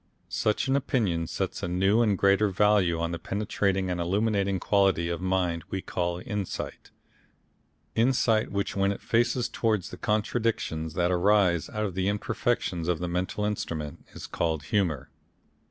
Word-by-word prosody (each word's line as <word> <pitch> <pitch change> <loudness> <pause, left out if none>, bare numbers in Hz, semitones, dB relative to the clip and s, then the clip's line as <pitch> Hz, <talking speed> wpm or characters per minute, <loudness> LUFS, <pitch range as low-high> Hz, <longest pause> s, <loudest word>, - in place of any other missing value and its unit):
Such 105 +5 0
an 135 - +2
opinion 100 -12 0
sets - - -3
a - - -2
new 95 +5 +3
and 105 -4 +2
greater 100 +2 +4
value 95 -3 +3
on 85 0 -1
that 85 -1 -5
penetrating 95 -2 -1
and 90 -1 -2
illuminating 100 +1 +1
quality 95 -3 +2
of 85 +1 -3
mind 90 -3 0
we 95 - -2
call 85 0 -2
insight, 105 -5 -4 1.0
insight 115 -2 +2
which 100 0 -2
when 100 0 +2
it 100 - -4
faces 120 +1 +1
towards 110 -5 -1
the - - -8
contradictions 105 -7 -1
that 90 0 +2
arise 90 -2 +3
out 105 0 -2
of 95 - -3
the 95 +1 -1
imperfections 105 -4 -1
of 90 -2 +1
the 90 +2 -3
mental 90 +4 -2
instrument 80 -8 -4
is - - -8
called 80 -3 -1
humour. 80 -7 -1
95 Hz, 155 wpm, -27 LUFS, 85-105 Hz, 1.0 s, greater